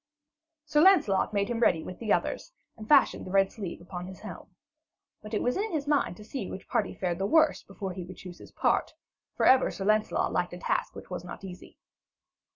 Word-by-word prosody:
Sir 295 0 +3
Lancelot 340 - +4
made 200 -1 0
him 235 0 -2
ready 165 -8 +3
with 185 - -8
the 220 -3 -2
others, - - 0 0.2
and 215 -1 -11
fashioned 285 -3 +5
the - - -8
red 195 0 +3
sleeve 195 -6 -6
upon 180 0 -7
his 190 0 -11
helm. - - -9 0.7
But 215 +1 -6
it - - 0
was 245 - +1
in 425 +2 -2
his 300 -3 -2
mind 285 - +1
to 210 - -11
see 215 -2 -5
which 190 - -8
party - - -1
fared 175 -2 -2
the 195 - 0
worse 315 +4 +4
before 195 -1 -6
he 180 -1 -6
would 185 +2 -10
choose 180 -2 -10
his - - -13
part; - - 0 0.4
for - - +2
ever 260 0 +6
Sir 195 - -5
Lancelot 215 +1 +1
liked 175 0 -1
a - - -6
task - - -1
which - - -11
was 180 -1 -4
not 180 +2 -9
easy. 185 -2 -10
195 Hz, 220 wpm, -28 LUFS, 185-245 Hz, 0.7 s, ever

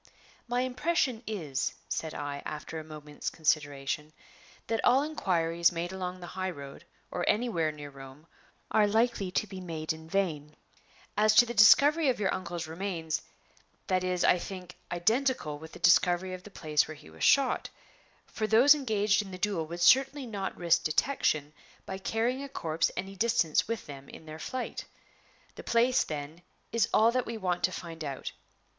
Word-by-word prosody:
"My 245 +1 0
impression 255 -1 0
is," 155 -11 -2
said 160 -1 -3
I, 145 -1 -4
after 155 +1 -6
a - - -7
moment's 150 -1 -6
consideration, 150 -1 -1 0.5
"that 225 0 -1
all 260 +3 +5
inquiries 170 - +1
made 175 +1 -3
along 185 -1 -5
the - - -6
high 185 0 -2
road, 140 -5 -9 0.3
or 175 - -2
anywhere 210 -9 +1
near 145 -1 -9
Rome, 135 +2 -12 0.5
are 210 -1 +4
likely 220 -2 +1
to 200 +4 0
be 190 -2 -8
made 160 -3 -3
in 160 0 -12
vain. 155 -6 -1 0.6
As 215 0 +4
to 240 - +8
the 235 - -5
discovery 285 +8 +6
of 250 - 0
your 195 -3 +1
uncle's 175 -2 -4
remains, 165 -1 -3 0.6
that 185 -1 +1
is, 180 -1 0
I 180 - +4
think, 180 -1 -8 0.2
identical 215 - 0
with 160 +1 -11
the - - -9
discovery 175 +2 +3
of 185 - -7
the 210 - -12
place 155 -6 0
where 155 - -8
he 80 - -15
was 80 - -8
shot; 275 -2 +3 0.6
for 215 - -3
those 240 +7 +7
engaged 215 -8 +1
in 200 - -9
the 185 - -7
duel 185 -5 -1
would 170 +2 -6
certainly 270 +8 +4
not 200 -5 -4
risk 170 -1 +2
detection 155 - 0 0.3
by 190 0 -5
carrying 230 +6 -1
a 280 - -6
corpse 160 -9 -1
any 195 +2 -4
distance 225 -7 +2
with 230 -2 -3
them 140 -2 -10
in 160 - -12
their 155 0 -9
flight. 255 +9 -5 0.7
The - - -10
place, 240 +2 +3
then, 150 +2 -6 0.3
is 230 0 +2
all 225 +2 +5
that 255 0 -1
we 230 - -4
want 180 -4 -2
to 185 - -2
find 165 -3 -7
out. 140 -3 -5
180 Hz, 175 wpm, -29 LUFS, 155-225 Hz, 0.7 s, to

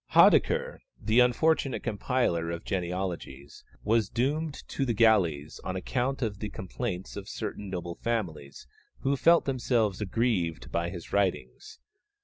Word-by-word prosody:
Haudicquer, 485 +1 +5 0.2
the 110 +3 +2
unfortunate 130 +2 +2
compiler 105 -6 0
of 85 0 -5
genealogies, 90 -7 -4 0.2
was 110 -1 +2
doomed 145 +5 -2
to 140 - -1
the 120 -4 0
galleys 90 -10 +3
on 95 - -3
account 130 +8 -1
of 105 -3 -3
the 105 - -4
complaints 95 -1 -5
of 100 0 -7
certain 105 -2 -5
noble 85 -2 -4
families 85 -12 -4 0.4
who 135 +1 +1
felt 170 +5 +4
themselves 120 -6 0
aggrieved 100 -5 -1
by 85 0 -1
his 85 -2 -9
writings. 90 -11 -1
105 Hz, 130 wpm, -28 LUFS, 85-125 Hz, 0.4 s, Haudicquer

